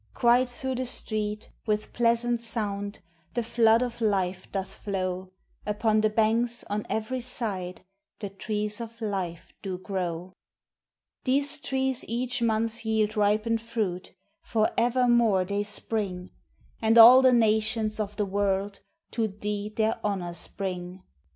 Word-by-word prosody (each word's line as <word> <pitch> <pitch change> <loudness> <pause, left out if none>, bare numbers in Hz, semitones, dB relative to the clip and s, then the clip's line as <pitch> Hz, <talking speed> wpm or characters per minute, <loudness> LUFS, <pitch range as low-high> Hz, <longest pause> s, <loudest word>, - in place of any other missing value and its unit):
Quite 245 +1 +4
through 260 +2 -3
the 255 0 -2
streets, 215 -2 -3 0.2
with 210 0 -1
pleasant 235 0 +2
sound, 205 -3 -3 0.3
The 240 - +1
flood 230 0 +4
of 240 -1 -5
life 190 -3 0
doth 195 -1 -3
flow; 185 -2 -3 0.3
Upon 215 +1 +1
the 215 - +3
banks, 230 +2 +1
on 210 0 -2
every 220 +4 -2
side, 200 -8 -4 0.3
The 205 - -5
trees 210 +2 -3
of 230 0 -8
life 185 -5 -4
do 190 -2 -4
grow. 180 -2 -4 0.9
These 280 +3 +2
trees 265 -3 -1
each 250 +2 -2
month 230 0 0
yield 220 -1 +1
ripened 215 +2 +2
fruit 210 -7 -3 0.3
For 220 -2 +1
evermore 235 -5 +3
they 200 +2 -1
spring; 205 -3 -3 0.5
And 225 +1 +4
all 240 +3 +11
the 260 -1 +6
nations 220 -1 +2
of 210 -1 -3
the 210 - 0
world 195 0 -1 0.3
To 225 -2 0
thee 210 0 -4
their 220 +1 0
honors 180 -5 -3
bring. 185 -1 -5
215 Hz, 135 wpm, -27 LUFS, 200-235 Hz, 0.9 s, all